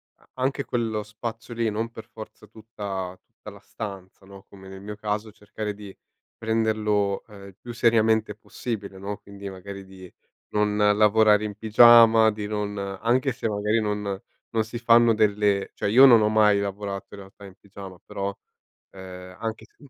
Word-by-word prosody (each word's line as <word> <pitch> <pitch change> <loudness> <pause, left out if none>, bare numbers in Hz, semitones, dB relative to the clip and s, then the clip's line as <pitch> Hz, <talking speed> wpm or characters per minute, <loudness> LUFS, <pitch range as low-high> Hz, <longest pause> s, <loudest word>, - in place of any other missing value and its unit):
a - - -29
anche 135 +2 -1
quello 110 -3 -2
spazio 115 +2 -7
lì, 115 -1 0
non 110 +2 -3
per 110 0 -11
forza 110 -2 -12
tutta 100 -4 -7
tutta - - -14
la - - -13
stanza, 95 -2 -9
no, 100 0 -14
come 95 -1 -14
nel 95 0 -10
mio 105 +1 -7
caso 105 +1 -4
cercare 105 +1 -6
di 100 -1 -11 0.4
prenderlo, 110 -3 0
ehm, 100 -2 -13
il 95 - -16
più 120 - -9
seriamente 110 -2 +2
possibile, 105 -2 -6
no, 100 +2 -5
quindi 100 0 -10
magari 95 +1 -9
di 95 -1 -14 0.4
non 105 0 +1
lavorare 105 0 +4
in 105 -1 -5
pigiama, 115 0 +6
di 105 -1 -6
non 105 -1 -3
anche 115 +7 -1
se 120 -1 -3
magari 105 +2 0
non 105 -2 -3 0.3
non 110 -1 +1
si 115 +1 -7
fanno 120 0 +5
delle 105 -2 +1
cioè - - -2
io 125 +6 +8
non 120 -4 +7
ho 105 - +3
mai 105 -2 +4
lavorato 100 0 -5
in 105 - -10
realtà 95 +1 -14
in 95 - -13
pigiama, 95 -2 -11
però, 100 0 -4 0.6
ehm, 90 -1 -11
anche 110 -1 -5
se - - -39
105 Hz, 170 wpm, -24 LUFS, 100-110 Hz, 0.6 s, io